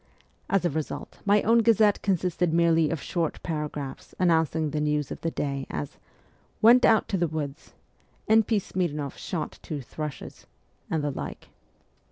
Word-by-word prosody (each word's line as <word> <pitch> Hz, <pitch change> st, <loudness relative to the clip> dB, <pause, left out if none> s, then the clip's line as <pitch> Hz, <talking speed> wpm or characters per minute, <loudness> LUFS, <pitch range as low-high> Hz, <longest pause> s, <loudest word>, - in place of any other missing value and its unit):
As 195 Hz, -2 st, +2 dB
a -, -, +3 dB
result 155 Hz, +1 st, -5 dB
my 205 Hz, +1 st, +4 dB
own 230 Hz, +2 st, +5 dB
Gazette 220 Hz, -2 st, +4 dB
consisted 180 Hz, -3 st, 0 dB
merely 165 Hz, -1 st, +3 dB
of 165 Hz, -, -2 dB
short 170 Hz, -4 st, -1 dB
paragraphs 150 Hz, -4 st, -5 dB
announcing 160 Hz, -3 st, +2 dB
the 150 Hz, 0 st, -1 dB
news 150 Hz, -1 st, 0 dB
of -, -, -6 dB
the 165 Hz, -, 0 dB
day: 140 Hz, -3 st, -3 dB
as, 75 Hz, -1 st, -5 dB, 0.3 s
' -, -, -37 dB
Went 245 Hz, +3 st, +7 dB
out 220 Hz, -, +4 dB
to 195 Hz, -, 0 dB
the 175 Hz, -, +2 dB
woods. 150 Hz, -1 st, -5 dB, 0.5 s
N. 220 Hz, +1 st, +6 dB
P. 220 Hz, 0 st, 0 dB
Smirn6ff 150 Hz, -7 st, -3 dB
shot 165 Hz, -4 st, -5 dB
two 155 Hz, -3 st, -5 dB
thrushes,' 150 Hz, +2 st, -7 dB, 0.4 s
and 160 Hz, -2 st, -1 dB
the 145 Hz, -, 0 dB
like. -, -, -7 dB
165 Hz, 165 wpm, -26 LUFS, 150-190 Hz, 0.5 s, Went